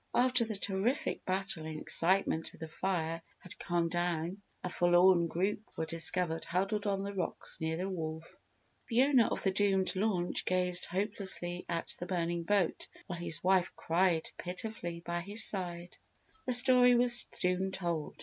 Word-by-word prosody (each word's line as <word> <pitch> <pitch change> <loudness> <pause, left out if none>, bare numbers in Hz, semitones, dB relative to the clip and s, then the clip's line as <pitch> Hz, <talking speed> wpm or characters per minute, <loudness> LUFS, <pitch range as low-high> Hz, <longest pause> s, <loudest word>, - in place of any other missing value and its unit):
After 250 -1 +2
the 220 -1 -6
terrific 200 +7 -3
battle 190 -3 -1
and 155 -1 -7
excitement 170 -1 0
with - - -19
the 160 - -6
fire 165 -1 -4 0.2
had 180 - -10
calmed 170 -1 -2
down 175 +2 -3 0.2
a - - -3
forlorn 175 0 +2
group 190 +5 -3 0.2
were 160 - -3
discovered 165 +1 +2
huddled 195 +4 -3
on 195 -1 -2
the 200 0 -6
rocks 190 -3 -4
near 160 0 -3
the 185 +2 -4
wharf. 160 -3 -7 0.5
The 240 +2 +2
owner 270 -5 +2
of - - -5
the 195 - 0
doomed 195 -1 -1
launch 185 -3 -1
gazed 180 -1 0
hopelessly 190 -2 -2
at 170 -1 0
the 175 - -7
burning 170 -2 -3
boat 185 0 -2 0.2
while 175 -2 -8
his 170 -3 -2
wife 185 -1 0
cried 170 -1 -1
pitifully 180 -2 -5
by 175 0 -5
his 205 +5 +5
side. 175 -4 -1 0.5
Their 250 - +7
story 250 0 +7
was 240 0 +9
soon 185 +1 -2
told. 170 -5 -5
180 Hz, 160 wpm, -30 LUFS, 170-200 Hz, 0.5 s, was